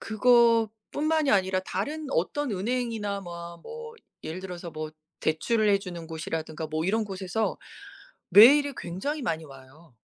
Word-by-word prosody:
...그거뿐만이 235 +6 +2
아니라 190 -1 +2
다른 285 +12 -4
어떤 250 - 0
은행이나 220 -1 -2
뭐 170 -2 -8
뭐 465 0 -9 0.3
예를 160 +4 -5
들어서 180 -2 -7
뭐 155 0 -5 0.3
대출을 215 +8 +1
해주는 180 -5 -1
곳이라든가 160 0 -4
뭐 155 +1 -2
이런 220 +4 +1
곳에서 195 +2 -2 0.7
메일이 275 +9 +8
굉장히 235 - -4
많이 160 -9 -2
와요. 135 +2 -16
195 Hz, 305 characters per minute, -27 LUFS, 170-235 Hz, 0.7 s, 메일이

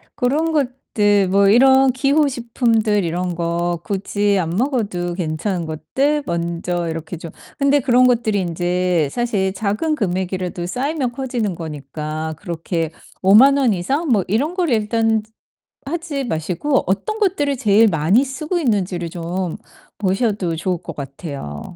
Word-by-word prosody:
그런 290 +5 +1
것들 220 -9 +1
뭐 200 +1 +4
이런 265 +4 +6
기호 280 +3 +2
식품들 230 -5 +1
이런 175 +1 -2
거 170 0 -1
굳이 205 +1 0
안 165 -2 -1
먹어도 200 - -1
괜찮은 170 +1 -2
것들 280 - -1
먼저 170 0 -2
이렇게 165 +2 -5
좀 165 0 -8 0.3
근데 280 +1 +4
그런 250 -1 +4
것들이 225 -5 +1
인제 175 -2 0
사실 205 -6 0
작은 210 +11 -1
금액이라도 185 -5 -2
쌓이면 260 - -2
커지는 245 -6 -2
거니까 155 0 -5
그렇게 165 -2 -3 0.3
50,000 230 +9 +7
원 255 -6 +3
이상 270 - -1
뭐 210 -6 +3
이런 280 - 0
거를 345 -8 +1
일단 225 0 +1 0.6
하지 320 -2 -3
마시고 185 - 0
어떤 430 - -1
것들을 295 -9 +1
제일 220 0 +4
많이 185 - +3
쓰고 300 +7 -3
있는지를 190 - -1
좀 175 +1 -3 0.4
보셔도 195 -3 0
좋을 175 +1 -2
것 165 - -7
같아요. 135 - -7
200 Hz, 280 characters per minute, -20 LUFS, 175-260 Hz, 0.6 s, 50,000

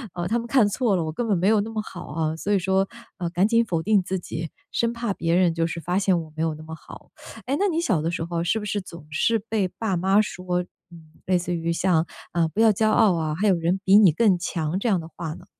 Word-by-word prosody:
“呃， 175 0 -2
他 235 - +1
们 235 - -4
看 235 -4 +4
错 210 -1 +1
了， 165 - 0
我 155 - -3
根 235 +6 -2
本 200 -4 +2
没 185 +3 +1
有 215 -1 +4
那 220 - -5
么 215 -1 -2
好 180 -4 -9
啊。” 160 +1 -2
所 200 +5 -3
以 200 - +3
说， 190 +2 +1 0.3
呃， 175 -3 -3
赶 185 +4 +2
紧 230 0 +3
否 165 -5 -1
定 205 0 +2
自 190 0 -3
己， 165 -2 -5 0.2
生 235 0 0
怕 235 -4 -3
别 165 -1 -1
人 180 -2 +3
就 165 0 0
是 170 0 -4
发 180 +3 -1
现 190 -3 +2
我 155 -1 -12
没 160 - -2
有 160 -2 -1
那 155 - -11
么 160 0 -8
好， - - -14 0.4
诶， 270 +3 0
那 400 +2 +2
你 330 -1 0
小 205 - +1
的 165 +2 -1
时 165 - -3
候 170 0 -2
是 220 +6 +1
不 210 - -6
是 205 0 -2
总 170 -4 -12
是 225 +8 +1
被 210 -2 -1
爸 215 -3 -2
妈 195 +4 +3
说， 180 -3 -2 0.3
嗯， 160 -2 -15
类 185 -1 +2
似 175 0 -3
于 165 0 -2
像， 170 -1 +2 0.3
“啊， 170 -2 +2
不 205 - -6
要 225 -1 +6
骄 215 +2 +2
傲 210 -3 +4
啊， 160 -2 -1
还 205 +5 0
有 190 - +4
人 170 +3 0
比 195 +2 +7
你 195 -6 +7
更 195 +1 +3
强 170 -1 -2
这 235 - 0
样 190 -5 +2
的 160 - -8
话 160 -2 -5
呢？” 175 - -13
185 Hz, 300 characters per minute, -24 LUFS, 165-210 Hz, 0.4 s, 比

